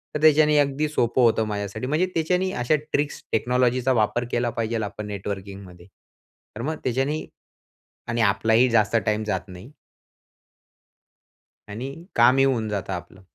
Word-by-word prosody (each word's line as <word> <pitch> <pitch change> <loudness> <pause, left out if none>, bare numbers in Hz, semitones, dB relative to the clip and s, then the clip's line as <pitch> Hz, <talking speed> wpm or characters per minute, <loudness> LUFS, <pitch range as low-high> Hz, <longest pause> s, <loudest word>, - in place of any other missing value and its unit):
तर 150 - -2
त्याच्याने 150 -1 +5
अगदी 145 +2 +1
सोपं 125 -4 +1
होतं 115 -2 +3
माझ्यासाठी. 105 +3 -4
म्हणजे 155 +6 +1
त्याच्याने 180 +3 0
अशा 120 +6 +2 0.2
ट्रिक्स 145 0 -1
टेक्नॉलॉजीचा 125 +2 +1
वापर 120 +1 +1
केला 120 0 0
पाहिजे 115 0 -2
आपण 105 +1 -6
नेटवर्किंगमध्ये. 95 -3 -7 0.7
तर 115 - -6
मग 155 +5 -2
त्याच्याने 135 +5 -1 0.8
आणि 115 0 0
आपलाही 110 +4 +3
जास्त 115 -1 +2
टाईम 110 0 0
जात 105 -1 -3
नाही. 90 +10 -11 2.0
आणि 120 +6 -5 0.3
कामही 125 +3 +5
होऊन 120 -5 +1
जातं 100 -4 -3
आपलं. 95 - -8
120 Hz, 135 wpm, -24 LUFS, 105-135 Hz, 2.0 s, त्याच्याने